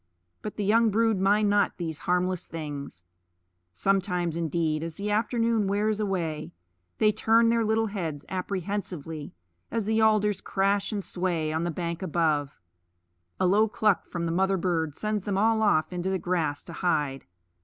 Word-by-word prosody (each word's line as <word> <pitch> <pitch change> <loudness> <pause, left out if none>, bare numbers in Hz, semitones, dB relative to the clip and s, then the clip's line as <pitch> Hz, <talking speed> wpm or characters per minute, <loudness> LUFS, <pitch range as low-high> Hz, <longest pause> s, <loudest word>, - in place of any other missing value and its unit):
But 210 - -6
the 210 - -2
young 225 +2 +4
brood 220 -1 +2
mind 205 +2 +3
not 205 -1 +2
these 160 -4 -4
harmless 180 0 +1
things. 145 - -6 0.7
Sometimes 180 - 0
indeed, 160 -1 0
as 165 -1 -5
the 205 +1 -3
afternoon 230 0 +1
wears 210 +2 +1
away, 170 -7 -2 0.4
they 215 -1 +4
turn 225 +2 +3
their 230 0 +2
little 220 +1 +2
heads 170 -9 -4
apprehensively 180 - -4 0.3
as 225 -2 -2
the 220 +1 +2
alders 210 -2 +3
crash 195 +2 0
and 205 -2 -2
sway 170 -5 -1
on 160 +2 -1
the - - 0
bank 170 +1 -3
above; 155 -5 0 0.8
a - - +2
low 205 +4 +4
cluck 210 -2 +1
from 170 -1 -3
the 165 - -1
mother 190 +3 +2
bird 165 -5 -1
sends 215 -1 -1
them 195 0 -2
all 220 +2 +3
off 185 -5 +2
into 180 +1 -2
the 190 - +1
grass 165 -6 -1
to 170 - -10
hide. 150 -6 -1
190 Hz, 165 wpm, -27 LUFS, 165-210 Hz, 0.8 s, young